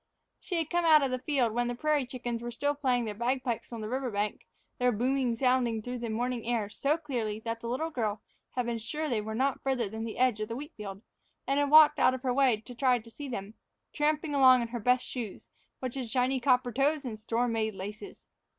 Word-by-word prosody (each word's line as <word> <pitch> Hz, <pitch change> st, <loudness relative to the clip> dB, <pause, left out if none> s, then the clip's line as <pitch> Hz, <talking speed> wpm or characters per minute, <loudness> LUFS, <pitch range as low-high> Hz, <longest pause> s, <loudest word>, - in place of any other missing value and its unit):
She 365 Hz, -, -5 dB
had 325 Hz, -2 st, -1 dB
come 345 Hz, 0 st, +2 dB
out 310 Hz, -3 st, +6 dB
to 270 Hz, -, +1 dB
the 255 Hz, 0 st, -2 dB
field 255 Hz, -5 st, +1 dB
when 240 Hz, +1 st, 0 dB
the 245 Hz, -, -2 dB
prairie 295 Hz, 0 st, +1 dB
chickens 240 Hz, -2 st, -4 dB
were 240 Hz, -, -4 dB
still 285 Hz, +5 st, -1 dB
playing 255 Hz, -4 st, 0 dB
their 215 Hz, -, -3 dB
bagpipes 245 Hz, +2 st, -2 dB
on 230 Hz, -2 st, -5 dB
the 215 Hz, -, -4 dB
river 260 Hz, +2 st, -2 dB
bank, 205 Hz, -1 st, -3 dB, 0.3 s
their 250 Hz, 0 st, +3 dB
booming 250 Hz, +2 st, +1 dB
sounding 250 Hz, -2 st, +2 dB
through 245 Hz, +1 st, -4 dB
the 235 Hz, -1 st, -4 dB
morning 240 Hz, +1 st, -2 dB
air 230 Hz, -3 st, -1 dB
so 280 Hz, +8 st, 0 dB
clearly 240 Hz, -9 st, -3 dB
that 230 Hz, 0 st, -4 dB
the 230 Hz, -, -6 dB
little 315 Hz, +7 st, -2 dB
girl 220 Hz, -6 st, -1 dB, 0.4 s
had 250 Hz, -1 st, 0 dB
been 235 Hz, -1 st, -2 dB
sure 305 Hz, +8 st, -3 dB
they 235 Hz, -6 st, 0 dB
were 220 Hz, +1 st, -5 dB
not 265 Hz, +3 st, 0 dB
farther 260 Hz, -5 st, 0 dB
than 220 Hz, +2 st, -5 dB
the 225 Hz, -1 st, -5 dB
edge 250 Hz, -4 st, +2 dB
of 215 Hz, -, -2 dB
the 230 Hz, -, -4 dB
wheat 295 Hz, +5 st, -7 dB
field, 200 Hz, -1 st, -8 dB, 0.4 s
and 275 Hz, +2 st, +1 dB
had 285 Hz, -1 st, +1 dB
walked 300 Hz, 0 st, +8 dB
out 255 Hz, -, +4 dB
of 255 Hz, -, -9 dB
her 255 Hz, -2 st, +1 dB
way 255 Hz, -4 st, +3 dB
to 245 Hz, -, -11 dB
try 250 Hz, 0 st, +3 dB
to 230 Hz, 0 st, -12 dB
see 290 Hz, +4 st, -7 dB
them, 205 Hz, -3 st, -5 dB, 0.4 s
tramping 300 Hz, 0 st, 0 dB
along 260 Hz, -3 st, +6 dB
in 230 Hz, -, -5 dB
her 240 Hz, 0 st, -4 dB
best 250 Hz, +3 st, +2 dB
shoes, 230 Hz, -6 st, -6 dB, 0.3 s
which 255 Hz, -2 st, -3 dB
had 255 Hz, -4 st, -4 dB
shiny 255 Hz, +2 st, +1 dB
copper 250 Hz, -1 st, +2 dB
toes 280 Hz, +4 st, +1 dB
and 220 Hz, -4 st, -5 dB
store 230 Hz, +3 st, 0 dB
made 220 Hz, -2 st, -1 dB
laces. 205 Hz, +2 st, -8 dB
245 Hz, 240 wpm, -30 LUFS, 230-270 Hz, 0.4 s, walked